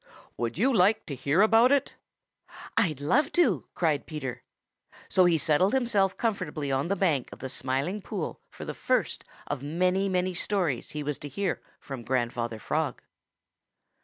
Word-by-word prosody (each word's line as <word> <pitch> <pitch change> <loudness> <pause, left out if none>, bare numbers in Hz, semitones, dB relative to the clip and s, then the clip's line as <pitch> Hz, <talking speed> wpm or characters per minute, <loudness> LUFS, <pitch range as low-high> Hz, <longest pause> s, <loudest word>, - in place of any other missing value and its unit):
"Would 120 +2 -3
you 255 +8 +3
like 215 +2 +3
to 150 - -5
hear 145 - +3
about 225 +4 +5
it?" 285 -1 +2 0.8
"I'd 160 -11 +2
love 280 - +2
to!" 250 - +2
cried 155 -5 0
Peter. 135 -5 -5 0.7
So 185 - +5
he 170 -2 +4
settled 170 - +2
himself 215 -7 +2
comfortably 165 - -2
on 135 +3 0
the 200 - +1
bank 165 -10 +1
of - - -9
the 130 - -6
Smiling 135 +10 -2
Pool 190 -4 -5
for - - -9
the - - -4
first - - 0 0.2
of 145 -3 -3
many, 180 +6 +1
many 185 0 0
stories 175 - -1
he 150 -1 -4
was 150 -1 -3
to 145 - -7
hear 190 +6 -2 0.2
from 135 -4 -7
Grandfather 120 -1 -1
Frog. - - -2
170 Hz, 160 wpm, -28 LUFS, 140-200 Hz, 0.8 s, about